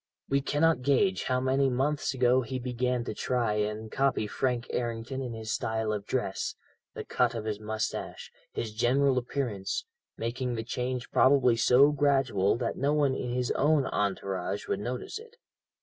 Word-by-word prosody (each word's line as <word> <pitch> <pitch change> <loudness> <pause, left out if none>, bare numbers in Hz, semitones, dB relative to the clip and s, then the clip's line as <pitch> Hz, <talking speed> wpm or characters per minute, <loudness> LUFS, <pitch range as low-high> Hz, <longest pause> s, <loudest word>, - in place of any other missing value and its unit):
We 140 0 +2
cannot 150 +1 +2
gauge 165 +9 +2
how 130 -1 +1
many 135 +1 +2
months 140 +4 0
ago 125 0 +4
he 130 +2 -4
began 125 0 -1
to - - -4
try 120 -4 0
and 105 +1 -2
copy 135 -5 +1
Frank 125 +2 -1
Errington 120 +2 -3
in 125 -3 -4
his 110 0 -5
style 110 -1 -1
of 105 -1 -5
dress, 120 -7 -2 0.4
the - - -5
cut 120 -1 +1
of 110 -2 -4
his 105 -1 -2
moustache, 110 0 -4 0.2
his 110 -2 -4
general 130 +4 +3
appearance, 120 -6 -3 0.3
making 120 +2 -2
the 110 - -3
change 125 +2 -3
probably 130 -3 +5
so 125 +5 +5
gradual, 135 -9 +2
that 120 -1 -2
no 140 +2 +1
one 145 -3 +2
in 125 - -3
his 125 0 -1
own 145 -1 +3
entourage 95 -2 -2
would - - -1
notice 125 - -4
it. 455 +1 -15
125 Hz, 165 wpm, -29 LUFS, 110-135 Hz, 0.4 s, probably